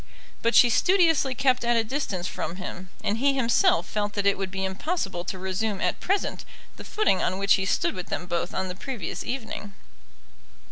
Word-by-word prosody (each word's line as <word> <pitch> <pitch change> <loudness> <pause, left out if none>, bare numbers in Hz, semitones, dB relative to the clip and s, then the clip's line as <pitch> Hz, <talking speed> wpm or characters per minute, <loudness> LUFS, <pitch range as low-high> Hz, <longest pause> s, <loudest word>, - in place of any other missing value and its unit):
But 230 +1 +1
she 240 - +7
studiously 325 - +3
kept 255 -1 +2
at 235 0 +2
a 225 - +3
distance 215 -8 -3
from 165 - -4
him, 185 0 -7
and 210 +3 0
he 275 +1 +3
himself 275 - +3
felt 205 -1 -2
that 205 -1 -1
it 200 - +4
would 195 -1 -3
be 190 0 -3
impossible 190 - -2
to 190 - -4
resume 190 +2 -2
at - - 0
present 395 +2 -1 0.3
the - - -9
footing 420 - +1
on 185 - 0
which 200 0 +3
he 190 - +1
stood - - +1
with 180 -2 -6
them 180 - -3
both 175 0 -2
on 190 0 -2
the 180 - -4
previous 210 - -5
evening. 220 -5 -5
205 Hz, 195 wpm, -26 LUFS, 190-265 Hz, 0.3 s, she